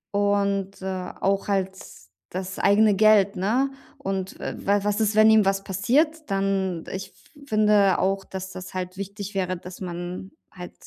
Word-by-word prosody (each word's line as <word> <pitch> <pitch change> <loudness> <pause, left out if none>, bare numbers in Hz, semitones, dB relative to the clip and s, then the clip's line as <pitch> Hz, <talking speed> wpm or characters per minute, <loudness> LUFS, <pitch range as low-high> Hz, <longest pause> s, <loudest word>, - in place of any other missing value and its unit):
Und, 200 -1 0
äh, 185 -1 -4
auch 195 +1 0
halt 190 -1 +1 0.6
das 185 +1 -5
eigene 205 +1 +4
Geld, 205 -1 +5
ne? 235 +9 +1 0.3
Und, 190 -1 -4
äh, - - -4
wa 200 +1 +3
was 210 +1 +1
ist, 215 -1 +2
wenn 215 0 +7
ihm 220 -1 +6
was 195 0 0
passiert? 295 - 0
Dann 195 -3 0
ich 190 0 -5
f 285 +7 -20
finde 210 -3 +4
auch, 195 +1 0
dass 190 0 -7
das 185 0 -8
halt 185 0 -4
wichtig 200 +1 -6
wäre, 185 -1 -1
dass 180 +2 -11
man 175 +1 -6 0.2
halt 180 -1 -9
195 Hz, 165 wpm, -24 LUFS, 190-205 Hz, 0.6 s, wenn